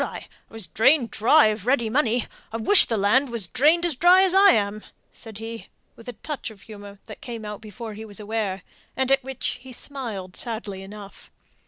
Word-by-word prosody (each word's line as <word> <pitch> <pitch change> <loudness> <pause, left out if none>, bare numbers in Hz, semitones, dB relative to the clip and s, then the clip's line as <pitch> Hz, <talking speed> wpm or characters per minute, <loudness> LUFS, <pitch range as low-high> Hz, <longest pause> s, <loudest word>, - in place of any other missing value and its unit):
I - - -7 0.2
was 225 -3 -5
drained 230 - +2
dry 240 +3 +4
of 215 0 -5
ready 250 -3 +2
money 240 -1 0 0.3
I 225 - -4
wish 380 - +7
the 225 - -2
land 230 +8 +2
was 235 -5 -3
drained 300 - +3
as 335 -5 -1
dry 355 +6 +5
as 375 -2 +3
I 395 +1 +7
am," 205 0 -1 0.3
said 220 -3 -9
he, 225 +1 -8 0.3
with 230 +1 -11
a - - -6
touch 295 -5 -5
of 210 -3 -16
humour 205 -2 -12
that - - -12
came 235 -7 -7
out 210 -1 -7
before 220 +1 -9
he 215 +2 -9
was 205 -2 -9
aware, 210 -3 -3 0.3
and 265 0 0
at 270 -1 +3
which 265 -1 -4
he 260 0 -12
smiled 230 -9 -6
sadly 215 -5 -5
enough. 200 +1 -12
225 Hz, 200 wpm, -23 LUFS, 210-265 Hz, 0.3 s, wish